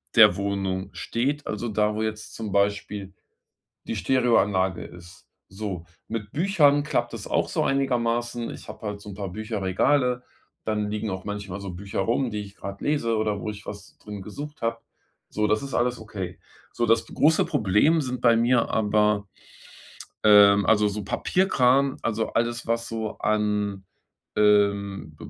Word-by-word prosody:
der -, -, +8 dB
Wohnung 95 Hz, -1 st, -2 dB
steht. 140 Hz, +5 st, -2 dB
Also 110 Hz, +2 st, -3 dB
da, 105 Hz, 0 st, +1 dB
wo 110 Hz, -, -2 dB
jetzt 110 Hz, 0 st, -4 dB
zum 110 Hz, -3 st, -5 dB
Beispiel 100 Hz, -1 st, -1 dB, 0.7 s
die -, -, -3 dB
Stereoanlage 105 Hz, -8 st, +2 dB
ist, 90 Hz, +2 st, -13 dB, 0.2 s
so. 95 Hz, -4 st, -6 dB, 0.2 s
Mit 105 Hz, -2 st, -5 dB
Büchern 145 Hz, -4 st, +3 dB
klappt 120 Hz, -6 st, -1 dB
das 110 Hz, -3 st, -6 dB
auch -, -, 0 dB
so -, -, 0 dB
einigermaßen. 120 Hz, -3 st, 0 dB
Ich -, -, -10 dB
habe 110 Hz, -, -9 dB
halt 105 Hz, -1 st, -4 dB
so'n 100 Hz, -1 st, -9 dB
paar 100 Hz, -2 st, -4 dB
Bücherregale, 110 Hz, +5 st, 0 dB, 0.4 s
dann 105 Hz, -1 st, -1 dB
liegen 105 Hz, 0 st, -2 dB
auch 95 Hz, +1 st, -5 dB
manchmal 100 Hz, -2 st, -5 dB
so 95 Hz, -2 st, -5 dB
Bücher 100 Hz, +2 st, -5 dB
rum, 120 Hz, +5 st, +1 dB
die 105 Hz, -1 st, -4 dB
ich 100 Hz, 0 st, -11 dB
gerade 100 Hz, 0 st, -8 dB
lese 120 Hz, -7 st, +1 dB
oder 105 Hz, -2 st, 0 dB
wo 105 Hz, -, -4 dB
ich 105 Hz, -1 st, -8 dB
was 100 Hz, -1 st, -9 dB
drin 105 Hz, -2 st, -8 dB
gesucht 145 Hz, +9 st, -8 dB
habe, 115 Hz, 0 st, -1 dB, 0.5 s
so, 105 Hz, 0 st, 0 dB
das 105 Hz, 0 st, +1 dB
ist 135 Hz, -, -6 dB
alles 120 Hz, 0 st, +1 dB
okay. 95 Hz, -5 st, -6 dB, 0.3 s
So, 120 Hz, -, 0 dB
das 115 Hz, 0 st, +3 dB
große 155 Hz, +2 st, +3 dB
Problem 110 Hz, -, +3 dB
sind 125 Hz, -2 st, -3 dB
bei 115 Hz, -1 st, +5 dB
mir, 120 Hz, +1 st, +3 dB
aber, 105 Hz, -1 st, +2 dB, 1.0 s
ähm, 100 Hz, -1 st, +7 dB
also 105 Hz, -1 st, +4 dB
so 105 Hz, 0 st, -3 dB
Papierkram, 135 Hz, -, +2 dB
also 110 Hz, -1 st, -2 dB
alles, 120 Hz, 0 st, -1 dB
was 115 Hz, 0 st, 0 dB
so 110 Hz, -1 st, -4 dB
an, 105 Hz, -2 st, 0 dB, 0.5 s
ähm, 100 Hz, -5 st, +2 dB
105 Hz, 160 wpm, -25 LUFS, 100-120 Hz, 1.0 s, der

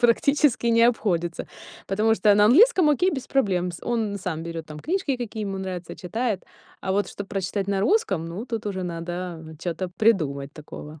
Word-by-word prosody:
практически 255 Hz, +2 st, +3 dB
не 230 Hz, 0 st, +4 dB
обходится. 175 Hz, -8 st, +1 dB, 0.4 s
Потому 215 Hz, +3 st, +2 dB
что 210 Hz, -2 st, +4 dB
на 205 Hz, 0 st, +5 dB
английском 365 Hz, -, +6 dB
окей 360 Hz, +6 st, +3 dB
без 265 Hz, -4 st, -4 dB
проблем 185 Hz, -9 st, +1 dB
с -, -, -10 dB
он 225 Hz, -4 st, 0 dB
сам 165 Hz, -4 st, -4 dB
берёт 165 Hz, -1 st, -6 dB
там 150 Hz, -1 st, -9 dB
книжки, 345 Hz, -6 st, -1 dB
какие 225 Hz, -3 st, -5 dB
ему 195 Hz, -1 st, -3 dB
нравятся, 185 Hz, -3 st, -5 dB
читает, 220 Hz, +2 st, -2 dB, 0.4 s
а 190 Hz, -, -2 dB
вот 205 Hz, +1 st, +1 dB
чтобы 200 Hz, -1 st, -7 dB
прочитать 195 Hz, 0 st, -2 dB
на 195 Hz, -1 st, +1 dB
русском, 200 Hz, -, +2 dB
ну 185 Hz, +9 st, -6 dB
тут 225 Hz, -3 st, -4 dB
уже 190 Hz, -2 st, -3 dB
надо 170 Hz, -1 st, -5 dB
чё-то 180 Hz, +2 st, -3 dB
придумать 150 Hz, -11 st, +1 dB
такого. 150 Hz, 0 st, -10 dB
200 Hz, 180 wpm, -24 LUFS, 175-235 Hz, 0.4 s, английском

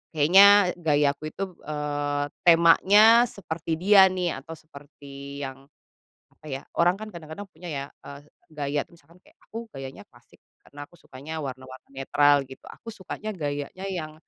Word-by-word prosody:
kayaknya 190 Hz, +5 st, +6 dB
gaya 150 Hz, -3 st, +2 dB
aku 155 Hz, -, -8 dB
itu, 195 Hz, -, -5 dB, 0.2 s
eee, 145 Hz, -1 st, -2 dB, 0.2 s
temanya 205 Hz, +8 st, +6 dB
seperti 170 Hz, -7 st, -7 dB
dia 195 Hz, +1 st, +6 dB
nih 180 Hz, -4 st, -2 dB
atau 160 Hz, -, -12 dB
seperti 140 Hz, -2 st, -12 dB
yang, 135 Hz, 0 st, -9 dB, 0.7 s
apa -, -, -23 dB
ya 135 Hz, -, -5 dB, 0.2 s
orang 175 Hz, +2 st, +4 dB
kan 215 Hz, -, -7 dB
kadang-kadang 170 Hz, +4 st, -9 dB
punya 170 Hz, +2 st, -11 dB
ya, 140 Hz, -2 st, -4 dB, 0.2 s
eee, 140 Hz, 0 st, -10 dB, 0.3 s
gaya 145 Hz, -1 st, -3 dB
tuh -, -, -21 dB
misalkan 170 Hz, +2 st, -23 dB
kayak -, -, -25 dB
aku 230 Hz, +1 st, -8 dB
gayanya 135 Hz, 0 st, -9 dB
klasik -, -, -24 dB, 0.2 s
karena 145 Hz, 0 st, -11 dB
aku 175 Hz, -, -22 dB
sukanya 150 Hz, +5 st, -9 dB
warna-warna 130 Hz, -1 st, -9 dB
netral 145 Hz, +1 st, +2 dB
gitu 130 Hz, -, -14 dB
aku -, -, -16 dB
sukanya 210 Hz, +2 st, -7 dB
gayanya 145 Hz, +3 st, -5 dB
yang, 160 Hz, -5 st, -5 dB
155 Hz, 155 wpm, -25 LUFS, 140-180 Hz, 0.7 s, kayaknya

